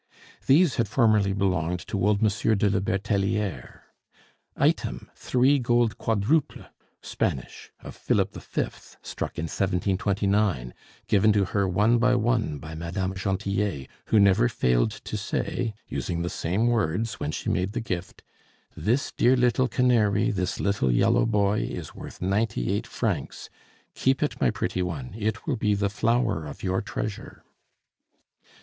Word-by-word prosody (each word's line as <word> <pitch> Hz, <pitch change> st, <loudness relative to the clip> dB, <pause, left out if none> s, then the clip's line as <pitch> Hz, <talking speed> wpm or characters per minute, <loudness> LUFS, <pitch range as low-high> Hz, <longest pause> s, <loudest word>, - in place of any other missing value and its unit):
These 155 Hz, +3 st, +4 dB
had 115 Hz, -3 st, +1 dB
formerly 110 Hz, -3 st, +3 dB
belonged 90 Hz, -3 st, 0 dB
to 100 Hz, -2 st, -1 dB
old 105 Hz, +1 st, +2 dB
Monsieur 110 Hz, +1 st, +2 dB
de 100 Hz, 0 st, +2 dB
la 95 Hz, -, +1 dB
Bertelliere. 100 Hz, +1 st, -2 dB, 0.8 s
Item, -, -, 0 dB
three 130 Hz, +3 st, +2 dB
gold 120 Hz, -2 st, +1 dB
quadruples, 115 Hz, +8 st, 0 dB, 0.4 s
Spanish, 65 Hz, -, -3 dB
of -, -, -10 dB
Philip -, -, 0 dB
V., -, -, -3 dB, 0.3 s
struck -, -, -5 dB
in -, -, -2 dB
1729, 95 Hz, -, 0 dB, 0.3 s
given 105 Hz, +2 st, +4 dB
to 100 Hz, -2 st, +2 dB
her 100 Hz, +1 st, 0 dB
one 105 Hz, +6 st, +3 dB
by 125 Hz, +1 st, +3 dB
one 115 Hz, -, 0 dB
by 75 Hz, +3 st, -9 dB
Madame 85 Hz, +4 st, -3 dB
Gentillet, 95 Hz, -5 st, -2 dB, 0.2 s
who 110 Hz, -, +3 dB
never 95 Hz, -11 st, +4 dB
failed 60 Hz, -, +2 dB
to 110 Hz, 0 st, -7 dB
say, 105 Hz, +2 st, -2 dB
using 85 Hz, -1 st, -3 dB
the 85 Hz, -, -3 dB
same 95 Hz, +8 st, -1 dB
words, 110 Hz, -2 st, 0 dB
when -, -, -2 dB
she -, -, -3 dB
made 95 Hz, +3 st, -1 dB
the 120 Hz, -, -2 dB
gift, 95 Hz, -5 st, -5 dB, 0.5 s
"This 125 Hz, +6 st, 0 dB
dear 125 Hz, +2 st, +3 dB
little 125 Hz, +1 st, +2 dB
canary, 115 Hz, -3 st, +2 dB
this 95 Hz, -3 st, -2 dB
little 100 Hz, -10 st, +1 dB
yellow -, -, +3 dB
boy, 105 Hz, -1 st, +2 dB
is -, -, -5 dB
worth -, -, -10 dB
ninety 100 Hz, -, 0 dB
eight -, -, -2 dB
francs! -, -, -3 dB, 0.4 s
Keep 130 Hz, +2 st, +1 dB
it, 150 Hz, -, -3 dB
my 65 Hz, -, +4 dB
pretty 90 Hz, -, -2 dB
one, 80 Hz, -7 st, -4 dB
it 110 Hz, +1 st, -3 dB
will -, -, -1 dB
be 105 Hz, -1 st, +1 dB
the 100 Hz, 0 st, 0 dB
flower 110 Hz, -6 st, 0 dB
of 70 Hz, -, -10 dB
your 95 Hz, 0 st, 0 dB
treasure." 100 Hz, 0 st, -6 dB
100 Hz, 145 wpm, -26 LUFS, 95-115 Hz, 0.8 s, These